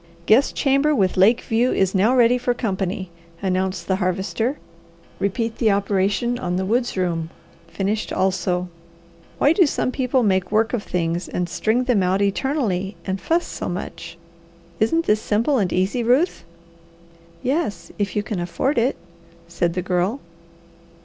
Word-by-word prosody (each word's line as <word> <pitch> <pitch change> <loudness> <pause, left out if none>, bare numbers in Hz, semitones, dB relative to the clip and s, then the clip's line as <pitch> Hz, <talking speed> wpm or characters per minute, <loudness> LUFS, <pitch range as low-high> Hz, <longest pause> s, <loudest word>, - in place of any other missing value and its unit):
"Guest 230 +9 +4
chamber 275 +2 +2
with 190 -6 +1
lake 205 +6 +4
view 235 +3 +1
is 190 -1 +1
now 210 +6 +3
ready 245 0 +4
for 245 0 0
company," 190 -4 -3 0.3
announced 185 -1 -1
the 190 - +1
Harvester. 195 +8 -1 0.6
"Repeat 225 +3 -2
the 225 - +3
operation 200 +4 +1
on 180 0 -2
the 185 +1 -1
woods 240 +2 0
room, 170 -3 -1 0.4
finished 200 +5 -2
also. 185 -1 0 0.7
Why 285 - +4
do 350 -2 +4
some 255 - -1
people 255 -1 +1
make 190 -3 +1
work 220 +2 +2
of 240 - 0
things 170 -2 -2
and 180 -1 -2
string 220 +7 0
them 245 -6 +2
out 185 +1 +1
eternally 200 -2 -1
and 190 0 -3
fuss 340 +1 +1
so - - -5
much? 175 -1 -6 0.6
Isn't 330 +10 +2
this 210 +1 +2
simple 235 +6 +1
and 190 -4 0
easy, 190 +7 0
Ruth?" 260 +10 +2 1.0
"Yes, 255 - -2
if 200 -2 -1
you 210 - 0
can 210 -4 -4
afford 235 - 0
it," 245 +4 +1 0.5
said 170 0 -1
the 180 - -1
Girl. 185 +7 0
205 Hz, 155 wpm, -22 LUFS, 185-245 Hz, 1.0 s, Guest